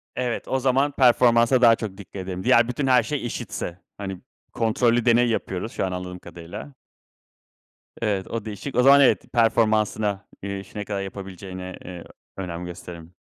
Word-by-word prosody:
Evet, 125 -2 -2
o 130 - 0
zaman 135 +2 +2
performansa 125 -1 +4
daha 115 -1 +7
çok 105 -4 -6
dikkat 100 - -13
ederim. 95 0 -5
Diğer 120 +3 +5
bütün 130 +3 -2
her 130 -1 +5
şey 150 -4 -3
eşitse, 90 -6 -5 0.2
hani, 95 -2 -6 0.3
kontrollü 115 +1 +2
deney 120 0 +4
yapıyoruz 110 -1 -3
şu - - -2
an 95 - -3
anladığım 90 0 -5
kadarıyla. 85 - -10 1.3
Evet, 100 -4 -1
o 115 -2 -4
değişik, 110 +6 -6
o 125 - +4
zaman 140 +2 +8
evet 135 - +3
performansına, 110 -3 +2 0.2
eee, 100 0 -4
işi 100 +2 -11
ne 105 - -3
kadar 100 -2 -3
yapabileceğine, 95 -1 -7
eee, 90 -2 -8 0.3
önem 90 -2 -5
gösteririm. 85 -1 -9
105 Hz, 165 wpm, -24 LUFS, 95-120 Hz, 1.3 s, zaman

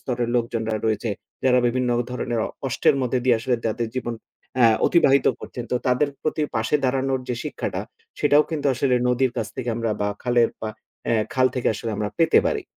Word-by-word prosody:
স্তরের 120 -2 -2
লোকজনরা 115 -2 -1
রয়েছে। 110 0 0 0.3
যারা 125 -1 +5
বিভিন্ন 125 0 0 0.2
ধরনের 120 -2 -2 0.3
কষ্টের 135 - +2
মধ্যে 125 0 0
দিয়ে 125 -2 +4
আসলে 125 +1 +1
তাদের 115 +1 -1
জীবন 120 -2 -2 0.5
আ - - +8 0.2
অতিবাহিত 140 -6 +4
করছেন। 120 - -7
তো 125 - +3
তাদের 125 +3 +2
প্রতি 155 0 -1
পাশে 110 +6 0
দাঁড়ানোর 130 0 +1
যে 125 - 0
শিক্ষাটা, - - -3 0.4
সেটাও 145 +1 +5
কিন্তু 150 -3 -2
আসলে 130 0 +1
নদীর 125 0 +2
কাছ 110 - -1
থেকে 125 -2 -4
আমরা 115 -1 -1
বা 105 - +1
খালের 120 -1 +3
পা 110 - -3 0.7
খাল 130 0 +4
থেকে 125 - 0
আসলে 115 +1 -4
আমরা 105 0 -1
পেতে 165 - +5
পারি। 425 -4 -1
125 Hz, 180 wpm, -23 LUFS, 115-130 Hz, 0.7 s, আ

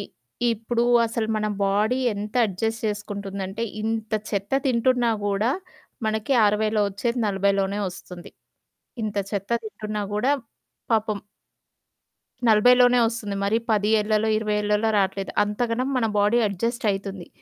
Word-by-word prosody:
ఇ - - -3 0.5
ఇప్పుడు 230 +2 -1 0.2
అసలు 225 -1 -2
మన 215 - -1 0.2
బాడీ 210 +6 +1 0.2
ఎంత 210 +1 -6
అడ్జస్ట్ 225 +3 -3
చేసుకుంటుందంటే, 200 0 -4 0.2
ఇంత 220 0 -3 0.2
చెత్త 200 +1 -3
తింటున్నా 245 -1 +2 0.2
కూడా 205 +4 +1 0.6
మనకి 220 +4 0
60లో 210 +1 +1 0.2
వచ్చేది, 235 +5 -2
40 200 0 +2
లోనే 195 +1 0
వస్తుంది. 180 -1 -10 0.7
ఇంత 210 -1 -3 0.2
చెత్త 200 0 -3
తింటున్నా 215 -1 -4
గూడా, 250 +7 +2 0.6
పాపం 215 -2 +1 1.3
40 220 +3 +6
లోనే 245 0 +6
వస్తుంది 225 -3 -4
మరి 205 +3 +2
10 210 -1 +2
ఏళ్లలో, 215 +1 +1
20 215 -1 -1
ఏళ్లలో 210 +1 +1
రాట్లేదు. 195 0 0
అంతగనం 230 +4 -1
మన 230 - +1
బాడీ 210 +4 +3
అడ్జస్ట్ 230 +6 -2
అయితుంది. 195 -2 -5
210 Hz, 125 wpm, -24 LUFS, 200-225 Hz, 1.3 s, 40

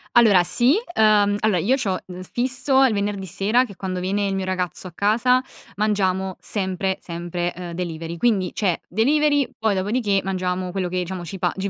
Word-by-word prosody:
Allora, 210 -7 +6
sì. 240 - +3 0.2
Ehm, 210 -3 +4
allora, 215 -3 +2
io 225 +10 +2
c'ho 200 -9 -1
n 180 0 -8
fisso 260 +5 +2
il 265 - +4
venerdì 200 -1 -2
sera 210 +7 +1
che 245 - -8
è - - -12
quando 185 -1 -4
viene 200 +2 0
il 195 - -1
mio 190 - -2
ragazzo 185 -1 -3
a - - -10
casa, 235 +7 +2 0.4
mangiamo 190 -3 0
sempre 190 -1 -2
sempre, 175 0 -4
uhm, 175 -1 -7
delivery. 170 -1 -5
Quindi, 195 -2 +1
c'è 185 -6 0
delivery, 285 - +2
poi 220 -2 +1
dopodiché 200 +1 0
mangiamo 185 -1 -2
quello 185 -1 -2
che 185 - -3
diciamo 180 0 -3
ci 175 +3 -7
pa 175 -1 0
gi 195 +1 -3
195 Hz, 190 wpm, -22 LUFS, 180-220 Hz, 0.4 s, Allora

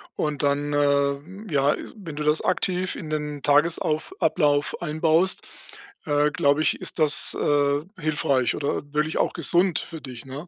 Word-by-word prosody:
und 150 -2 -3
dann, 145 +1 0
äh, 145 +7 -1
ja, 140 +1 +2 0.2
wenn 170 -8 -9
du 150 - -4
das 150 +1 +1
aktiv 185 0 -1
in 155 - -8
den 150 -1 -4
Tagesauf 155 - +1
Ablauf 145 -3 +1
einbaust, 160 +3 +1 0.6
äh, 145 0 +2
glaube 145 +2 +1
ich, 155 - 0
ist - - -3
das, 150 -2 +7
äh, 145 0 +1 0.2
hilfreich 140 -6 0
oder 140 -1 -3
wirklich 150 +2 -1
auch - - 0
gesund 175 +1 +2
für 165 -2 -8
dich, 125 -3 -10
ne? 140 +6 -8
150 Hz, 155 wpm, -23 LUFS, 145-160 Hz, 0.6 s, das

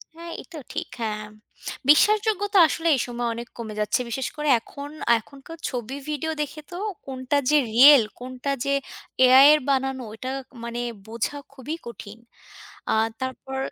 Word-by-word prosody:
হ্যাঁ, 335 +1 -9
এইটাও 315 -4 -11
ঠিক। - - -3
হ্যাঁ, 215 -1 -3
ম - - -18 0.6
বিশ্বাসযোগ্যতা 410 +4 +4
আসলে 325 +3 -2
এই - - -2
সময়ে 240 -1 -2
অনেক 235 +1 -7
কমে 225 -2 -6
যাচ্ছে। 210 +3 +1
বিশেষ 255 +3 -2
করে 300 -1 -1
এখন, 280 +5 -9 0.3
এখনকার 280 +7 -13
ছবি, 250 0 -5
ভিডিও 305 +2 -2
দেখে 300 +1 -5
তো 350 - -6 0.3
কোনটা 260 +1 -2
যে 300 - +5 0.2
রিয়েল, 265 +1 +9 0.2
কোনটা 255 +2 -4
যে 280 - +1 0.5
AI 260 +2 +8
এর 305 - +4
বানানো? 265 -1 0
ওটা 255 +4 -6 0.3
মানে 235 0 -4 0.3
বোঝা 230 +5 -3 0.2
খুবই 280 +4 -5
কঠিন। 225 -2 -9 0.8
আর 220 +1 +3
তারপর 260 +1 -5
265 Hz, 155 wpm, -24 LUFS, 235-300 Hz, 0.8 s, রিয়েল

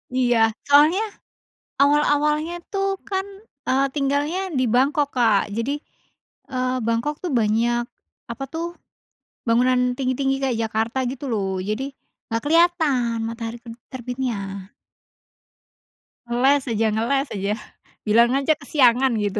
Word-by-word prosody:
Iya, 235 -3 +3
soalnya 300 +8 +5 0.8
awal-awalnya 295 +3 +2 0.2
tuh 390 -1 -1
kan, 380 -1 -1 0.4
eee, 270 +1 +2
tinggalnya 295 +7 0
di 255 - +2
Bangkok, 280 +5 +2
Kak, 225 -5 +3
jadi, 255 +6 -1 0.7
eee, 255 0 -1
Bangkok 235 +6 -1
tuh 360 - -2
banyak 235 +1 +1 0.4
apa 260 +4 -4
tuh, 335 +2 -4 0.7
bangunan 250 +2 +3
tinggi-tinggi 270 +1 0
kayak 260 -4 0
Jakarta 225 +4 -1
gitu 270 +2 -6
loh, 190 -4 -1
jadi 220 +8 -3 0.4
nggak 230 0 -1
kelihatan 305 -8 +3
matahari 230 0 -5
ter 235 -1 -9 0.2
terbitnya. 230 -7 -5 1.5
Ngeles 265 +4 +3
aja 225 0 +1
ngeles 270 +6 0
aja, 200 +1 -1 0.5
bilang 230 +3 +4
aja 280 +3 +1
kesiangan 260 -2 +3
gitu. 205 +1 -1
255 Hz, 115 wpm, -22 LUFS, 230-285 Hz, 1.5 s, soalnya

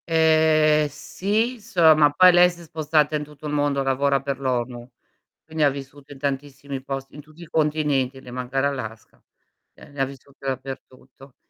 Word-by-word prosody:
Ehm, 155 -2 +4
sì, 210 - -2
solo 175 -8 +4
ma 150 -1 +5
poi 180 +5 +6
lei 175 0 +6
si 175 -1 -11
è - - -11
spostata 155 -1 0
in 150 - -2
tutto 150 0 -13
il 150 - -3
mondo, 145 -2 +1
lavora 135 +1 +1
per 135 -1 -4
l'ONU, 125 -2 -3 0.6
quindi 160 0 -4
ha 145 - +5
vissuto 140 +1 -10
in 140 - -12
tantissimi 140 0 -4
post 135 0 -5
in 150 - -11
tutti 155 +3 -17
i - - -9
continenti, 150 -4 0
le 125 - -12
manca 125 +2 -3
l'Alaska, 130 -6 -4 0.5
ehm, - - -16
lei 140 - -8
ha - - +3
vissuto 135 +1 -12
dappertutto, 130 0 -8
145 Hz, 180 wpm, -23 LUFS, 135-155 Hz, 0.6 s, poi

